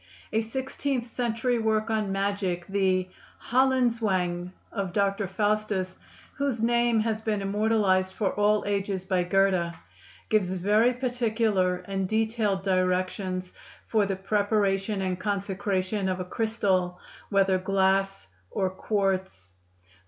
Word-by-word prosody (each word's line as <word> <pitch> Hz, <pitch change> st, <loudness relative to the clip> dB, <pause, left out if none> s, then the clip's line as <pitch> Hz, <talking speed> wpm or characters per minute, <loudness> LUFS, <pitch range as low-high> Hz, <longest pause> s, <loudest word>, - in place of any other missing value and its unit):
A 220 Hz, -, +3 dB
sixteenth 265 Hz, +2 st, -3 dB
century 240 Hz, 0 st, -1 dB
work 220 Hz, 0 st, +1 dB
on 215 Hz, -3 st, 0 dB
magic, 195 Hz, -3 st, -1 dB
the 190 Hz, -1 st, +1 dB, 0.4 s
"Höllenzwang" 230 Hz, -9 st, +2 dB, 0.2 s
of 195 Hz, -5 st, -3 dB
Dr. 200 Hz, 0 st, +1 dB
Faustus, 205 Hz, -1 st, -1 dB, 0.4 s
whose 275 Hz, -6 st, -1 dB
name 235 Hz, -1 st, +3 dB
has 220 Hz, 0 st, -1 dB
been 215 Hz, -2 st, -1 dB
immortalized 200 Hz, -2 st, +2 dB
for 200 Hz, -4 st, 0 dB
all 210 Hz, 0 st, +2 dB
ages 195 Hz, -2 st, -1 dB
by 185 Hz, -1 st, +1 dB
Goethe, 180 Hz, -2 st, +2 dB, 0.5 s
gives 195 Hz, -4 st, +2 dB
very 210 Hz, +6 st, +3 dB
particular 225 Hz, -7 st, 0 dB
and 195 Hz, -1 st, -2 dB
detailed 220 Hz, -3 st, 0 dB
directions 185 Hz, 0 st, 0 dB, 0.3 s
for 215 Hz, -3 st, +2 dB
the 195 Hz, -, -1 dB
preparation 200 Hz, 0 st, 0 dB
and 185 Hz, -1 st, -2 dB
consecration 195 Hz, 0 st, -1 dB
of 185 Hz, 0 st, -2 dB
a 185 Hz, -, -3 dB
crystal, 185 Hz, -4 st, 0 dB, 0.3 s
whether 195 Hz, -2 st, +3 dB
glass 195 Hz, -, +1 dB, 0.2 s
or 190 Hz, -1 st, -1 dB
quartz. 190 Hz, -, -2 dB
200 Hz, 115 wpm, -27 LUFS, 185-220 Hz, 0.5 s, A